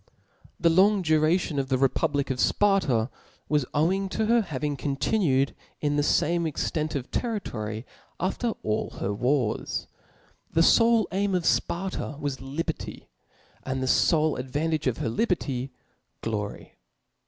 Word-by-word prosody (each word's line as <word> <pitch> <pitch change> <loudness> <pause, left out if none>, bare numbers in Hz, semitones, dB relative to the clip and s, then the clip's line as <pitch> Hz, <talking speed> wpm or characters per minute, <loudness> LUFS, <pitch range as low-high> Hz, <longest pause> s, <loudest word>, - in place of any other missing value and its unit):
The 170 - +4
long 195 +3 +4
duration 155 -1 +2
of 135 -1 -2
the 130 - +2
republic 135 +1 +1
of 130 - -3
Sparta 140 - +2 0.4
was 150 -4 +1
owing 190 +6 +1
to 220 +3 -1
her 235 +2 +4
having 145 -5 -3
continued 140 0 +1 0.3
in 145 -1 0
the 145 - +2
fame 170 +3 +2
extent 155 0 -2
of 135 -2 -4
territory 115 - -3 0.3
after 220 +5 -1
all 110 0 -2
her 100 +1 -1
wars. 125 +1 0 0.7
The 165 - +4
fole 230 +1 +5
aim 195 +1 0
of 175 -2 -1
Sparta 175 -5 -1
was 140 -3 -3
liberty; 140 +5 -5 0.5
and 130 0 -3
the - - -1
fole 155 +3 +3
advantage 145 +4 -1
of 125 - 0
her - - -2
liberty, 135 - -1 0.5
glory. 105 -2 -5
150 Hz, 135 wpm, -26 LUFS, 130-185 Hz, 0.7 s, fole